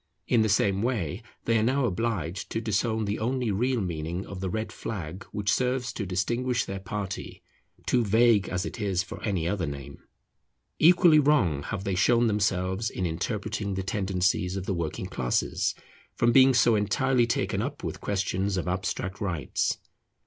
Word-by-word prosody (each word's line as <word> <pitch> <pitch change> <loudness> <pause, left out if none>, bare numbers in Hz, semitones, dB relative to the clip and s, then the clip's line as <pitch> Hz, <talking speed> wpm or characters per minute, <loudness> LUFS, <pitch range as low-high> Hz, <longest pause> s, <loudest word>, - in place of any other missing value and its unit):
In 115 - +4
the 110 - +2
same 100 -1 +2
way 105 - -1 0.2
they 115 -1 +3
are - - +1
now 130 +3 +2
obliged 100 -4 -2
to - - -2
disown 110 0 0
the 100 +1 -2
only 125 0 0
real 120 +4 +1
meaning 85 0 -3
of 95 - -8
the 95 0 -2
red 110 +4 -3
flag 95 -3 -6
which 100 0 -1
serves 125 -1 0
to 100 - -4
distinguish 120 +7 0
their 95 0 -5
party, 95 0 -5 0.4
too 125 -2 +2
vague 110 -2 +4
as 90 +1 -2
it 115 - -6
is 95 -3 0
for - - -9
any 95 -6 -1
other 90 -3 -1
name. 70 -1 -7 0.8
Equally 170 -1 +7
wrong 100 - +3
have 95 +5 -4
they 100 -2 -1
shown 120 +6 +3
themselves 100 -1 0
in 95 - -3
interpreting 100 +4 -2
the 95 - -2
tendencies 95 -1 0
of 95 - -4
the 95 - -1
working 85 -3 -3
classes, - - -1 0.4
from 120 0 +3
being 130 +1 +6
so 120 -1 +5
entirely 120 +4 +2
taken 115 - 0
up - - -4
with - - -5
questions 95 0 -1
of 90 - -2
abstract 95 +1 -3
rights. 85 -10 -1
100 Hz, 170 wpm, -27 LUFS, 90-115 Hz, 0.8 s, Equally